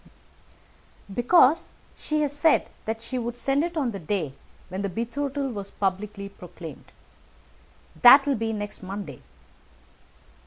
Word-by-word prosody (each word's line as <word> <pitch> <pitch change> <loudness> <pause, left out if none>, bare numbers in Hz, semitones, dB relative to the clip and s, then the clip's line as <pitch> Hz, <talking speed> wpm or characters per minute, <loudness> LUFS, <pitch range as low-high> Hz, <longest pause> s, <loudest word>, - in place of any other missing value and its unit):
"Because 270 - +4 0.2
she 305 0 -1
has 290 -1 -1
said 310 +2 +3
that 225 +1 -3
she 255 +1 -3
would 240 0 -4
send 275 +4 +1
it 340 0 -3
on 265 -6 0
the 200 - -6
day 165 -4 -2 0.4
when 185 +2 -4
the 200 - -1
betrothal 270 +7 -2
was 200 -4 -6
publicly 200 +1 -3
proclaimed. 180 -4 -11 1.1
That 270 +3 +9
will 285 - +2
be 225 -2 -1
next 205 -1 -5
Monday." 195 +1 -7
225 Hz, 130 wpm, -26 LUFS, 200-275 Hz, 1.1 s, That